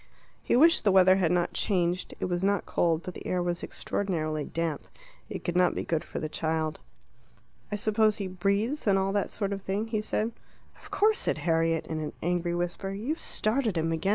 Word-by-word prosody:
He - - +1
wished 325 +6 +6
the 205 - +4
weather 185 0 +6
had 175 -4 +2
not 175 -1 +1
changed; 180 -2 0
it - - -1
was 175 0 -1
not 200 -1 +1
cold, 165 -1 +1
but 185 - -6
the - - -8
air 180 - 0
was 175 -1 -2
extraordinarily 155 -6 -2
damp. 165 -2 -3 0.4
It - - -6
could 175 - -2
not 180 0 +3
be - - -2
good 160 -2 -1
for - - -6
the 155 - -3
child. 160 0 -2 0.9
"I - - 0
suppose 215 +1 +2
he 200 - -3
breathes, 200 +9 -1
and 195 -1 +5
all 195 0 +1
that 200 0 0
sort 200 -1 -2
of 195 - -5
thing?" 200 +4 -2
he 215 -2 0
said. 215 +1 -1 0.5
"Of - - -14
course," 430 +2 +3
said - - 0
Harriet, 165 -1 +2
in 160 -1 -4
an 155 -1 -4
angry 175 0 0
whisper. 175 +2 -2
"You've 225 - -3
started 220 -3 0
him 165 0 0
again. 165 +4 -1
185 Hz, 210 wpm, -28 LUFS, 170-205 Hz, 0.9 s, wished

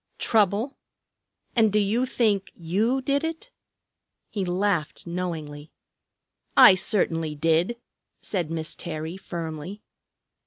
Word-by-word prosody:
Trouble! 215 +4 +1 0.8
And 220 -3 +4
do 210 - +2
you 215 +5 +1
think 210 -6 +1
you 215 +10 0
did 280 +2 +1
it?" 325 +9 -5 0.8
He 200 - -2
laughed 180 -3 -1
knowingly. 165 -4 -5 0.9
"I - - +10
certainly 165 -5 +1
did," 165 +9 +1 0.4
said 175 -6 -2
Miss 160 -1 -2
Terry 160 +1 -5
firmly. 170 +1 -6
185 Hz, 105 wpm, -25 LUFS, 165-215 Hz, 0.9 s, I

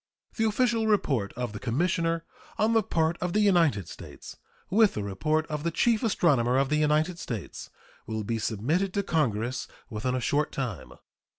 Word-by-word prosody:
The 225 - +1
official 225 0 +1
report 135 - +1
of 125 -3 -4
the 105 - -6
commissioner 165 - 0 0.3
on 220 +2 +2
the 225 - +4
part 165 -3 0
of 180 -1 -1
the 215 - +2
United 165 - +3
States, - - -10 0.4
with 215 +1 +4
the 105 - -2
report 155 +11 0
of 150 -2 -4
the 170 - 0
chief 220 +7 +2
astronomer 140 - +2
of 135 0 +2
the 150 - +2
United 155 +3 +1
States, 110 -7 -6 0.4
will 110 -1 -3
be 115 +2 -2
submitted 145 - -1
to 200 - +1
Congress 125 - -1 0.2
within 120 +4 -2
a - - 0
short 145 +5 0
time. 125 - -5
155 Hz, 175 wpm, -27 LUFS, 120-185 Hz, 0.4 s, the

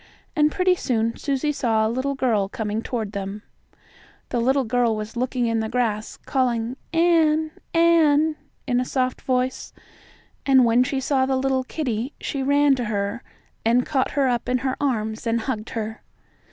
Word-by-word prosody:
And 300 -1 +3
pretty 365 +1 +3
soon 230 -9 -1
Susie 285 +1 -1
saw 225 -6 +1
a - - +2
little 260 +5 -1
girl 220 -7 +1
coming 220 -2 -3
toward 225 -4 -3
them. 200 +1 -5 0.9
The 240 - -1
little 265 +3 +2
girl 235 -1 +1
was 215 +1 -6
looking 250 0 -1
in 230 -1 +1
the 220 0 -2
grass, 225 -3 -1
and - - -28
calling, 245 -3 0 0.2
"Ann 320 -2 +3 0.2
Ann," 320 -2 +4 0.3
in 245 -2 +1
a - - +1
soft 255 0 -1
voice. 255 0 -1 0.7
And 265 -2 +5
when 235 +2 +4
she 270 +1 -2
saw 265 0 +1
the 265 -1 +1
little 265 0 +1
kittie 255 -3 -3
she 275 - -3
ran 285 +1 +4
to 245 - -2
her 205 +2 -2 0.4
and 240 +2 +3
caught 265 -3 0
her 275 -2 +3
up 245 -2 -1
in 255 - +2
her 260 - 0
arms 220 -4 -1
and 230 0 +1
hugged 220 -2 -4
her. 220 0 -4
250 Hz, 175 wpm, -23 LUFS, 225-275 Hz, 0.9 s, And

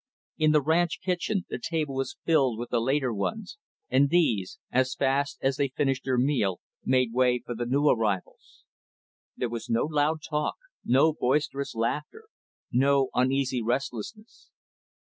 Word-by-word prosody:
In 155 -1 +4
the 150 -2 +3
ranch 165 +3 +1
kitchen, 185 +1 -1
the - - -3
table 155 -4 -2
was 135 0 -3
filled 135 -8 +3
with 120 +1 -6
the 120 - +2
later 130 0 +1
ones; 215 - -4 0.3
and 135 +2 +3
these, 120 - +1
as 130 0 +1
fast 140 +1 0
as 135 0 +1
they 140 -1 +1
finished 135 0 -1
their 130 -2 +1
meal, 120 -8 +1 0.2
made 125 -3 +2
way 125 0 +3
for 120 - -4
the 120 +1 -4
new 140 +4 +2
arrivals. 105 -8 -1 0.7
There 125 - -1
was 115 -1 -6
no 115 0 +2
loud 155 +1 0
talk; 150 -1 -1 0.3
no 140 +6 +4
boisterous 140 0 -1
laughter; 150 - -2 0.5
no 135 +1 +3
uneasy 130 0 +1
restlessness. 125 - -4
135 Hz, 150 wpm, -27 LUFS, 125-150 Hz, 0.7 s, In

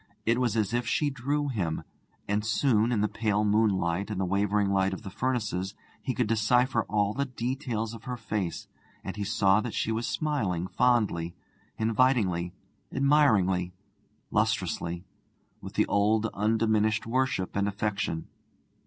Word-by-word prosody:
It 115 +2 +2
was 115 -3 +1
as 110 0 0
if 120 0 0
she 145 +5 +1
drew 140 +3 -1
him; 90 -10 -2 0.4
and 105 +1 0
soon, 110 0 +2
in 110 -4 +1
the 105 - +3
pale 105 -1 0
moonlight 100 -3 +1
and 105 -3 -3
the 95 - +1
wavering 100 +2 +1
light 95 0 +2
of 95 - -7
the 100 - -7
furnaces, 105 -6 -2 0.3
he 130 - -2
could 125 - +1
decipher 115 +2 +2
all 105 -1 +1
the 140 +4 -1
details 120 -2 -3
of 115 -1 -10
her 125 -1 -4
face, 105 -6 -3 0.4
and - - -5
he 105 - -3
saw 100 0 +3
that 115 0 -5
she 110 - 0
was 115 +2 -1
smiling 110 - -1
fondly, 105 -7 +1 0.4
invitingly, 110 -7 +2 0.4
admiringly, 105 -11 +3 0.6
lustrously, 85 +2 -1 0.6
with - - -8
the - - +3
old 105 +2 +2
undiminished 110 0 +1
worship 125 -5 0
and 100 0 +1
affection. 100 -5 -2
110 Hz, 150 wpm, -28 LUFS, 100-120 Hz, 0.6 s, the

